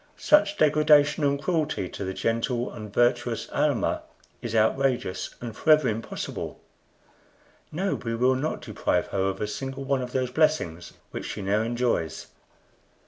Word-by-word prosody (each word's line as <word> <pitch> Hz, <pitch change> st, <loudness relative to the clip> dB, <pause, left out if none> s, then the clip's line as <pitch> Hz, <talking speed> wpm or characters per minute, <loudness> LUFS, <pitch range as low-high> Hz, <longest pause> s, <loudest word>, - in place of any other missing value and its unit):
Such 205 Hz, -9 st, +3 dB
degradation 150 Hz, 0 st, +4 dB
and 140 Hz, 0 st, +2 dB
cruelty 155 Hz, -, -1 dB
to -, -, -6 dB
the 95 Hz, 0 st, -4 dB
gentle 120 Hz, +2 st, -1 dB
and 105 Hz, -3 st, -8 dB
virtuous 120 Hz, +3 st, +1 dB
Almah -, -, +1 dB, 0.4 s
is 115 Hz, -2 st, -4 dB
outrageous 120 Hz, -2 st, +1 dB
and 115 Hz, -2 st, -7 dB
forever 155 Hz, +2 st, +4 dB
impossible; 110 Hz, +1 st, -5 dB, 1.1 s
no, 190 Hz, +5 st, -1 dB
we 115 Hz, -1 st, -3 dB
will 125 Hz, +3 st, +3 dB
not 145 Hz, +5 st, -2 dB
deprive -, -, -1 dB
her 100 Hz, -, -1 dB
of 95 Hz, 0 st, -2 dB
a -, -, -1 dB
single 135 Hz, +6 st, -5 dB
one 135 Hz, -1 st, 0 dB
of 125 Hz, -1 st, -5 dB
those 130 Hz, -1 st, -1 dB
blessings 125 Hz, -, 0 dB, 0.2 s
which -, -, -5 dB
she 105 Hz, -, -5 dB
now 100 Hz, +3 st, +1 dB
enjoys." 115 Hz, -8 st, -1 dB
125 Hz, 145 wpm, -26 LUFS, 110-150 Hz, 1.1 s, degradation